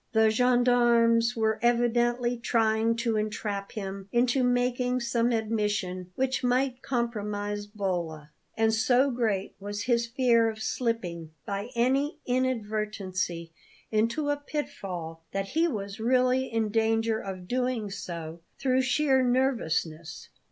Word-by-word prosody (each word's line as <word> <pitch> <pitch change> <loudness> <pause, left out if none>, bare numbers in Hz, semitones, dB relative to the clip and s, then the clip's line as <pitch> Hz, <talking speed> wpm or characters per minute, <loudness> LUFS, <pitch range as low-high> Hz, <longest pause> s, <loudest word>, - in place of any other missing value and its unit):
The 220 -1 +5
gendarmes 240 -1 +3
were 220 -1 +1
evidently 240 +1 +2
trying 225 -1 +2
to 230 -1 0
entrap 210 -2 -3
him 195 -1 -6
into 245 +2 +2
making 250 0 +1
some 235 0 +1
admission 210 -5 -1
which 265 0 0
might 250 +1 +1
compromise 205 -5 -2
Bolla; 175 -7 -3 0.3
and 220 0 +3
so 250 +5 +3
great 220 -6 -1
was 205 +1 -4
his 235 -2 +1
fear 230 -2 +3
of 220 -1 -7
slipping, 185 -9 -2
by 200 +3 -4
any 270 +6 +1
inadvertency, 210 -8 -2 0.4
into 230 +8 +1
a 290 - 0
pitfall, 180 - -5
that 195 0 -2
he 325 +4 +2
was 200 -8 -5
really 255 +2 +2
in 225 -1 0
danger 225 0 +1
of 185 -3 -7
doing 245 -4 -1
so 170 -4 -6 0.2
through 260 -1 +2
sheer 265 0 +2
nervousness. 170 - -1
230 Hz, 125 wpm, -28 LUFS, 205-245 Hz, 0.4 s, The